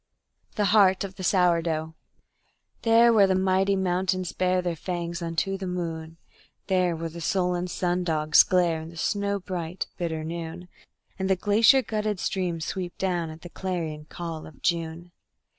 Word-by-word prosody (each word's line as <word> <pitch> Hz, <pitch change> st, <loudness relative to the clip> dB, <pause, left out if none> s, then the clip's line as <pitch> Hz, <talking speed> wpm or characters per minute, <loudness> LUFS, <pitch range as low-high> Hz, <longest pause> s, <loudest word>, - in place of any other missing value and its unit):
The 210 Hz, -, +1 dB
Heart 190 Hz, -3 st, +5 dB
of 195 Hz, -1 st, -6 dB
the 190 Hz, -, -7 dB
Sourdough 170 Hz, -4 st, +1 dB, 0.9 s
There 230 Hz, +1 st, +5 dB
where 205 Hz, -3 st, +6 dB
the 190 Hz, -, +2 dB
mighty 190 Hz, +1 st, +2 dB
mountains 185 Hz, -1 st, 0 dB
bare 185 Hz, 0 st, +1 dB
their 175 Hz, -2 st, -2 dB
fangs 170 Hz, +1 st, -4 dB
unto 170 Hz, +4 st, -2 dB
the 190 Hz, -, -4 dB
moon, 165 Hz, -2 st, -4 dB, 0.5 s
There 185 Hz, -3 st, +1 dB
where 165 Hz, +1 st, -4 dB
the 170 Hz, +1 st, -9 dB
sullen 180 Hz, +1 st, 0 dB
sun 180 Hz, 0 st, -1 dB
dogs 155 Hz, -3 st, +5 dB
glare 175 Hz, -3 st, +2 dB
in 160 Hz, -, -8 dB
the 170 Hz, -, -12 dB
snow 200 Hz, +3 st, -1 dB
bright, 180 Hz, -2 st, -4 dB
bitter 160 Hz, -3 st, -3 dB
noon, 170 Hz, +2 st, -6 dB, 0.5 s
And 190 Hz, 0 st, -1 dB
the 190 Hz, -, +4 dB
glacier 215 Hz, +7 st, +4 dB
glutted 215 Hz, -3 st, -2 dB
streams 175 Hz, -4 st, -2 dB
sweep 180 Hz, -2 st, -4 dB
down 175 Hz, -3 st, -1 dB
at 160 Hz, +1 st, -10 dB
the 175 Hz, -, -9 dB
clarion 165 Hz, -5 st, -4 dB
call 165 Hz, 0 st, -6 dB
of 150 Hz, -, -16 dB
June. 170 Hz, 0 st, -2 dB
180 Hz, 160 wpm, -26 LUFS, 165-190 Hz, 0.9 s, where